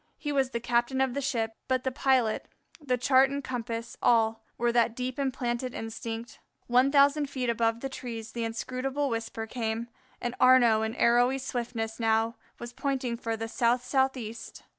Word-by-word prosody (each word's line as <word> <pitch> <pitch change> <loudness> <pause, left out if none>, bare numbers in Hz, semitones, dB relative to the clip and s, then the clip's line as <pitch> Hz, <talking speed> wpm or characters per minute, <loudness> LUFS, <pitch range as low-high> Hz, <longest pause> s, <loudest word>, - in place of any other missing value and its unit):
He 295 - -3
was 270 -2 +1
the 235 - -3
captain 240 +2 0
of 265 -2 +1
the 280 - -2
ship, 230 -5 -1
but 255 -1 +1
the 260 - -1
pilot, 255 -4 +1 0.4
the 255 -3 +1
chart 260 +2 +4
and 280 +1 -4
compass, 235 -2 -4
all, 225 -1 +3
were 240 0 +2
that 235 -1 +2
deep 255 +2 -4
implanted 255 -2 -2
instinct. 225 +1 -6 0.3
One 250 +3 +4
thousand 285 0 +4
feet 255 -3 -1
above 230 0 0
the 270 - -2
trees 230 -4 -6
the 235 - -3
inscrutable 255 +5 -2
whisper 225 -1 -3
came, 225 0 -3 0.3
and 240 - -3
Arnaux 245 -4 +6
in 220 +1 -2
arrowy 245 +3 +4
swiftness 235 -3 -4
now 225 +1 +2 0.2
was 240 0 -8
pointing 265 -2 -2
for 230 -1 -3
the 225 +1 -4
south 240 +1 +1
southeast. 255 -4 -2
240 Hz, 170 wpm, -28 LUFS, 230-260 Hz, 0.4 s, Arnaux